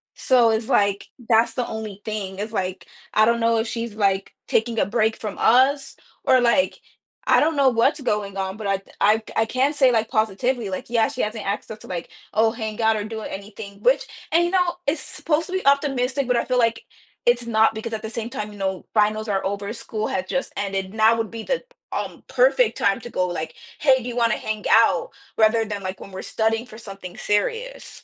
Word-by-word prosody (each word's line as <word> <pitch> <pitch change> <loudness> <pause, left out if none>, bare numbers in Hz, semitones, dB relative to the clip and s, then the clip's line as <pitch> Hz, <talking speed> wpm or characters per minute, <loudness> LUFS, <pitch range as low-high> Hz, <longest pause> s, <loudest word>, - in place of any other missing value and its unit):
so 245 -3 +4
it's 220 0 -1
like, 200 -6 +2 0.2
that's 225 0 +4
the 250 - -1
only 215 -2 -6
thing. 200 -3 -4
It's 215 +1 -4
like, 190 -3 -3 0.3
I 215 - +5
don't 235 +1 +2
know 230 0 +2
if 225 - -1
she's, 230 -2 -4
like, 195 -2 0
taking 230 0 +1
a - - +3
break 220 +1 +1
from 210 -3 -6
us 270 +3 +3 0.3
or, 260 - +5
like, 245 +4 +2 0.5
I - - +5
don't 315 +1 +2
know 275 -2 +5
what's 265 +5 +2
going 210 -5 -1
on, 190 +1 -3
but 215 -2 -5
I'd 195 -1 0 0.2
I 215 +2 +3
I 225 - +3
can 260 +5 +1
say, 270 -4 +4
like, 225 -1 +1
positively, 220 +1 0
like, 185 - -5
yeah, 230 -2 +3
she - - -4
hasn't 215 0 -3
asked 200 +2 -3
us 215 - -8
to, - - -13
like, 175 -2 -5 0.2
oh, 220 +1 +3
hang 220 -2 -5
out 220 0 +3
or 205 - -3
do 220 0 -6
anything, 200 0 -8
which 255 +5 +3 0.3
and, 340 - +5
you 345 - 0
know, 360 -2 +2
it's 290 +2 0
supposed 305 +2 -1
to 370 - -7
be 375 -4 -2
optimistic, 275 -2 +2
but 250 - +2
I 235 - +2
feel 255 +1 0
like 230 -1 +1 0.4
it's 240 0 +3
not 220 -1 +3
because 225 +1 -5
at 220 - -3
the 220 - -5
same 230 0 -4
time, 210 -5 -5
you 205 - -12
know, 190 -1 -2
finals 215 0 +2
are 195 -1 0
over. 200 +1 -3
School 220 -2 -4
had 185 0 -2
just 270 +5 -2
ended. 195 -1 -2
Now 220 +1 +5
would 225 -2 -2
be 230 -1 -6
the, - - -1 0.3
um, - - -4
perfect - - +3
time - - +2
to 240 - -8
go, 185 -5 0
like, 160 -3 -4 0.2
"Hey. 260 -4 +4
Do 245 - -4
you 245 - -6
wanna 230 -2 +3
hang 215 -1 -4
out?" 225 -6 +4 0.3
rather 225 +1 +4
than, 205 -2 -5
like, 185 0 -5
when 195 - -10
we're 190 - -6
studying 225 +1 0
for 220 -3 -12
something 195 -5 -9
serious. 465 - -2
220 Hz, 225 wpm, -23 LUFS, 205-245 Hz, 0.5 s, I